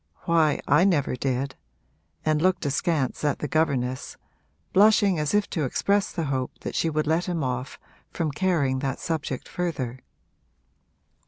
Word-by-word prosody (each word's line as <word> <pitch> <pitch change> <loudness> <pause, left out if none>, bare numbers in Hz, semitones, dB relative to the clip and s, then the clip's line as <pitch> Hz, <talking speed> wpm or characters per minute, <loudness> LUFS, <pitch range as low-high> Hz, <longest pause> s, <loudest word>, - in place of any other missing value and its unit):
Why, 160 -3 +2
I 150 +5 +5
never 160 -9 +2
did,' 130 +1 -1 0.7
and 155 -1 +2
looked 185 -1 +2
askance 145 -1 0
at 145 -1 +1
the 150 - -3
governess, 130 -5 -1 0.6
blushing 200 -3 +5
as 150 +6 0
if 205 -1 +2
to 160 - -1
express 200 +9 +1
the 170 - -3
hope 130 -3 -2
that - - -5
she 165 - +1
would 155 0 0
let 160 +3 +1
him 170 -4 -2
off 125 0 -3 0.3
from 160 -3 -2
carrying 145 -5 +1
that 135 -1 -2
subject 150 -5 -3
further. 135 -8 -3
150 Hz, 150 wpm, -25 LUFS, 135-175 Hz, 0.7 s, I